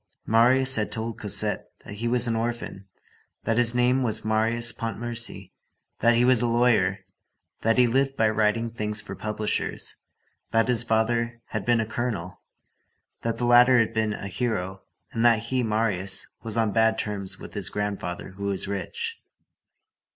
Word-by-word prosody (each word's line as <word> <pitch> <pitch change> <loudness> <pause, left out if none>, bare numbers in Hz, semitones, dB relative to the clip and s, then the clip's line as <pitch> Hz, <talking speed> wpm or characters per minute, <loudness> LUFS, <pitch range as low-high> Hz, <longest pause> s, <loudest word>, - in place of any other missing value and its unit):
Marius 130 +3 +5
had 105 - -1
told 115 0 -4
Cosette 105 -1 0 0.2
that - - -8
he 115 +3 -3
was 120 0 +3
an 115 - 0
orphan, 115 -4 -4 0.6
that 115 +1 +1
his 120 0 +3
name 125 +2 +3
was 110 -3 -1
Marius 115 +2 +2
Pontmercy, 115 -3 -5 0.5
that 120 0 +4
he 120 +1 +3
was 125 -2 +4
a 120 - +1
lawyer, 110 -5 +2 0.6
that 115 +2 +2
he 125 - +6
lived 135 +3 +1
by 110 - +3
writing 110 +1 +1
things 105 -2 -2
for - - -7
publishers, 105 0 -3 0.5
that 115 +2 +2
his 120 -2 +3
father 115 +1 0
had 110 -3 -4
been 120 -1 +4
a 110 - 0
colonel, 110 -6 -4 0.8
that 115 0 -2
the 120 - -1
latter 120 +1 +6
had 115 -1 +2
been 110 -1 0
a 100 - -6
hero, 95 -3 -3 0.3
and 115 - -1
that 120 -1 +6
he, 115 +3 -2
Marius, 105 -4 0 0.2
was 115 0 -2
on 110 -2 +2
bad 110 +1 +3
terms 100 -3 -3
with - - -11
his - - -3
grandfather 100 -4 -4
who 100 +2 -7
was 100 -1 -1
rich. 460 - -4
115 Hz, 165 wpm, -25 LUFS, 105-120 Hz, 0.8 s, he